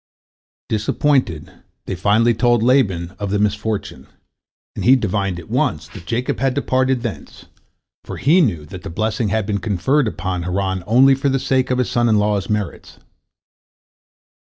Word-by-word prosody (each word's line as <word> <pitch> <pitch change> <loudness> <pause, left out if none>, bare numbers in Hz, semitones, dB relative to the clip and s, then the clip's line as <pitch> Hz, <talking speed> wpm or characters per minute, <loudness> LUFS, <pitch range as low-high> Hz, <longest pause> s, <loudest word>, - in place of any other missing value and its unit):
Disappointed, 110 - 0 0.3
they - - -4
finally 105 +6 +2
told 120 0 +2
Laban 100 -10 +2
of 100 -1 -3
the 105 - 0
misfortune, 105 +1 -2 0.7
and - - -4
he 130 +3 +6
divined 100 -6 -1
at 80 - -12
once 75 +1 -1
that 85 -3 -12
Jacob 120 +5 -2
had 135 0 0
departed 130 -2 0
thence, 115 -4 -7 0.6
for - - -7
he 165 +7 +4
knew 85 - 0
that 90 +4 -10
the - - -7
blessing 110 +6 -1
had 110 +1 0
been 100 0 -2
conferred 115 +7 +1
upon 95 -3 -3
Haran 95 +1 -2
only 130 +5 +5
for 135 +1 0
the 135 - +1
sake 130 -1 0
of 125 - +1
his 125 - -1
son 120 -1 +2
in 110 - +3
law's 105 -2 0
merits. 105 -3 -4
110 Hz, 160 wpm, -19 LUFS, 95-125 Hz, 0.7 s, he